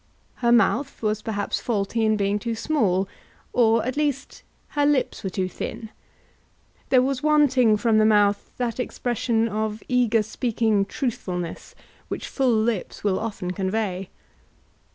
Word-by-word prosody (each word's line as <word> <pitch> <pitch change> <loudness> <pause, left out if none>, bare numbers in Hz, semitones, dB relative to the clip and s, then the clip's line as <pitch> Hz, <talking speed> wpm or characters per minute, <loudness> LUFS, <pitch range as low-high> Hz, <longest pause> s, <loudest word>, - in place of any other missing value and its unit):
Her 235 -1 +2
mouth 240 +3 +2
was 215 0 0
perhaps 205 -3 -2
faulty 220 0 -1
in 215 -1 +3
being 200 0 0
too 230 +1 -3
small, 210 -8 +1 0.5
or, 230 -2 +3
at 255 - -2
least, 285 -2 -2 0.3
her 290 - 0
lips 285 -3 +1
were 190 - -2
too 185 0 -2
thin. 220 +4 -6 1.0
There 255 -2 +5
was 265 -1 -1
wanting 270 -7 +4
from 220 0 +3
the 215 - +4
mouth 205 -1 +3
that 245 -1 -2
expression 235 -2 0
of 215 0 -3
eager 240 -3 +2
speaking 220 -2 0
truthfulness 185 - -4 0.3
which - - -5
full 265 -2 0
lips 220 -3 -1
will 195 -2 +1
often 205 -5 -4
convey. 190 -1 -2
220 Hz, 140 wpm, -24 LUFS, 205-250 Hz, 1.0 s, There